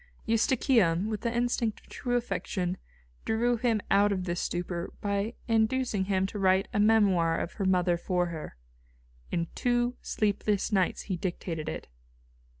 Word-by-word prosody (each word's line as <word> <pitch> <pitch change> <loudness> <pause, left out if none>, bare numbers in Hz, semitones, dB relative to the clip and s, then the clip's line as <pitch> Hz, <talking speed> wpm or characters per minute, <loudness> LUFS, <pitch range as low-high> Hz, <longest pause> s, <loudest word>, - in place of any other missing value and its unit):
Eustochium, 225 -5 +2
with 215 - -3
the 235 0 -1
instinct 240 -2 0
of - - -23
true 245 -1 -3
affection, 185 -6 -2 0.5
drew 235 +2 +1
him 230 -1 +1
out 205 +1 +5
of 185 -2 -1
this 175 -1 -2
stupor 175 0 -3
by 200 +3 -1
inducing 225 -2 +1
him 190 -1 +1
to 205 +2 -5
write 190 +1 +3
a 205 - +1
memoir 195 -6 +4
of 170 - -3
her 200 - -3
mother 180 -2 +3
for 180 0 0
her. 160 - -7 0.7
In 170 -1 0
two 245 0 0
sleepless 210 -1 0
nights 190 -3 +1
he 185 -3 -3
dictated 170 -3 -4
it. - - -6
200 Hz, 150 wpm, -29 LUFS, 180-225 Hz, 0.7 s, out